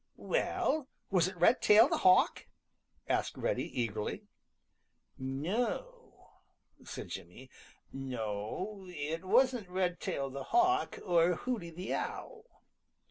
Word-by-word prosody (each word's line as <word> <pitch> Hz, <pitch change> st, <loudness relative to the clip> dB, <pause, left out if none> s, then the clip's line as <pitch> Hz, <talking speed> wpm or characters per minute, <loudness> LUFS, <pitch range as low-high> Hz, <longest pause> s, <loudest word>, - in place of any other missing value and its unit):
"Well, 315 Hz, -, 0 dB, 0.2 s
was 180 Hz, -3 st, +4 dB
it 185 Hz, -, -6 dB
Redtail 225 Hz, -1 st, +6 dB
the 325 Hz, +1 st, 0 dB
Hawk?" 185 Hz, -1 st, +4 dB, 0.6 s
asked -, -, 0 dB
Reddy -, -, -1 dB
eagerly. 110 Hz, -3 st, -2 dB, 1.0 s
"No," 215 Hz, -, -3 dB, 0.5 s
said -, -, -7 dB
Jimmy. -, -, -9 dB, 0.4 s
"No, 130 Hz, -, -4 dB
it 165 Hz, 0 st, -4 dB
wasn't 245 Hz, 0 st, +3 dB
Redtail 180 Hz, -6 st, -1 dB
the 135 Hz, 0 st, -6 dB
Hawk 370 Hz, +2 st, +2 dB
or 175 Hz, -1 st, +4 dB
Hooty 225 Hz, -5 st, -3 dB
the 180 Hz, +3 st, -5 dB
Owl. 460 Hz, 0 st, -6 dB
185 Hz, 100 wpm, -32 LUFS, -, 1.0 s, Redtail